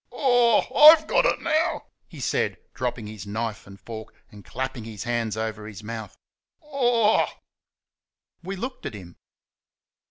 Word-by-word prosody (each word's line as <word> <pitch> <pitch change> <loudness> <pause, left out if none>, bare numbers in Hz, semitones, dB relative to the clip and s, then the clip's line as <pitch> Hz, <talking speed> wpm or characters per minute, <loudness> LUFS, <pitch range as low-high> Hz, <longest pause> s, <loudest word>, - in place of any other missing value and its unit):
"Oh 245 -4 +3
h - - -8
h!...I'VE 305 +3 +8
got - - +3
it - - 0
now!" 315 0 0 0.2
he - - -12
said, - - -1 0.2
dropping 125 -3 -3
his 105 -2 -9
knife 105 -1 -4
and 100 0 -13
fork 110 +2 -9 0.2
and 105 -1 -13
clapping 130 -3 -5
his 110 -3 -7
hands 115 -2 -2
over 110 -1 -4
his 105 -2 -10
mouth. 110 0 -7 0.6
"Ooh!" 240 -5 +3 1.2
We 190 +3 -5
looked 250 +7 -6
at - - -7
him. 90 -4 -12
115 Hz, 150 wpm, -25 LUFS, -, 1.2 s, h!...I'VE